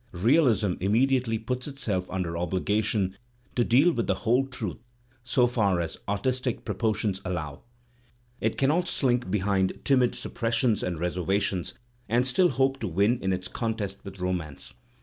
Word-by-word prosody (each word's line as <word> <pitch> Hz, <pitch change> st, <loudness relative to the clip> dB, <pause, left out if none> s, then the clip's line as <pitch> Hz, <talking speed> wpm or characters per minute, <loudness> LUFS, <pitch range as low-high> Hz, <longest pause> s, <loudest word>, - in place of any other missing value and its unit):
Realism 115 Hz, -, +3 dB
immediately 115 Hz, +4 st, +2 dB
puts 125 Hz, +5 st, -4 dB
i 95 Hz, -4 st, +1 dB
under 90 Hz, -2 st, -2 dB
obligation 95 Hz, +2 st, 0 dB, 0.4 s
to 120 Hz, -, +3 dB
deal 135 Hz, +10 st, +5 dB
with 120 Hz, -8 st, -2 dB
the -, -, +2 dB
whole 125 Hz, +4 st, +3 dB
truth 115 Hz, -8 st, -5 dB, 0.4 s
so 125 Hz, 0 st, +3 dB
far 105 Hz, -7 st, +1 dB
as 85 Hz, -2 st, -4 dB
artistic 125 Hz, +5 st, -1 dB
proportions 105 Hz, -4 st, -1 dB
allow; 80 Hz, -6 st, -4 dB, 0.8 s
it 110 Hz, -, -1 dB
cannot 155 Hz, +6 st, +2 dB
slink 125 Hz, -, +1 dB
behind 95 Hz, -1 st, 0 dB
timid 130 Hz, -3 st, +3 dB
suppressions 115 Hz, -1 st, 0 dB
and 90 Hz, -2 st, -2 dB
reservations 90 Hz, +2 st, -1 dB, 0.3 s
and 120 Hz, +3 st, +3 dB
still 175 Hz, +8 st, +3 dB
hope 135 Hz, -1 st, +1 dB
to -, -, -2 dB
win 100 Hz, +8 st, +2 dB
in 95 Hz, -, 0 dB
its 95 Hz, 0 st, -2 dB
contest 110 Hz, -3 st, -3 dB
with 95 Hz, -1 st, -9 dB
Romance. 90 Hz, -7 st, -3 dB
110 Hz, 145 wpm, -27 LUFS, 95-125 Hz, 0.8 s, deal